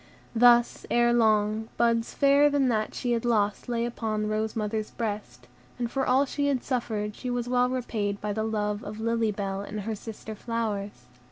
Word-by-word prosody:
Thus, 240 0 +5
erelong, 220 -2 +3
buds 230 -1 +1
fairer 280 +1 +5
than 280 -3 +2
that 215 -2 -1
she 245 - -2
had 235 -1 0
lost 210 -2 0
lay 235 -1 0
on 215 -2 -1
the - - -1
rose 215 0 -1
mother's 215 0 -2
breast, 205 - -5 0.3
and 240 -1 -2
for 270 -1 -1
all 265 +3 +4
she 285 +1 -1
had 270 -3 0
suffered 215 -5 -2
she 255 - -5
was 245 -1 -2
well 250 0 +2
repaid 215 -5 -2
by 210 0 -2
the 220 - -2
love 210 -1 -1
of 210 +1 -7
Lily 230 -1 +1
Bell 195 -1 -3
and 210 +1 -5
her 220 +3 -3
sister 220 +1 -8
flowers. 215 -2 -4
225 Hz, 185 wpm, -27 LUFS, 210-240 Hz, 0.3 s, Thus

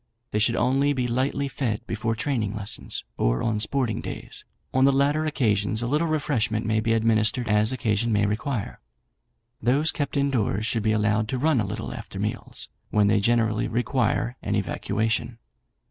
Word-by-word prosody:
They 105 - 0
should 115 +2 +3
only 135 +3 +2
be 125 -3 -1
lightly 130 +3 0
fed 120 -5 -3
before 115 0 -2
training 115 -4 -1
lessons, 105 -1 -4 0.2
or - - +1
on 110 -2 0
sporting 115 0 -1
days; - - -7 0.3
on 130 - +3
the 140 - +6
latter 145 +3 +2
occasions 110 -6 +1
a - - -1
little 150 +6 +1
refreshment 140 -8 0
may 110 0 +1
be 115 +1 +1
administered 115 +1 +2
as 105 +2 +3
occasion 115 -3 0
may 105 -1 +3
require. 110 +2 -2 0.8
Those 140 +7 +3
kept 145 -1 -3
in 140 0 +2
doors 110 -4 0
should 115 -1 0
be 110 +1 +1
allowed 105 0 +1
to 130 - -2
run 140 -2 +2
a 105 - -2
little - - -5
after - - -8
meals, - - -4 0.2
when 105 -1 +3
they 105 0 +4
generally 110 0 +2
require 120 0 0
an - - -1
evacuation. 110 +2 -1
115 Hz, 175 wpm, -25 LUFS, 110-130 Hz, 0.8 s, the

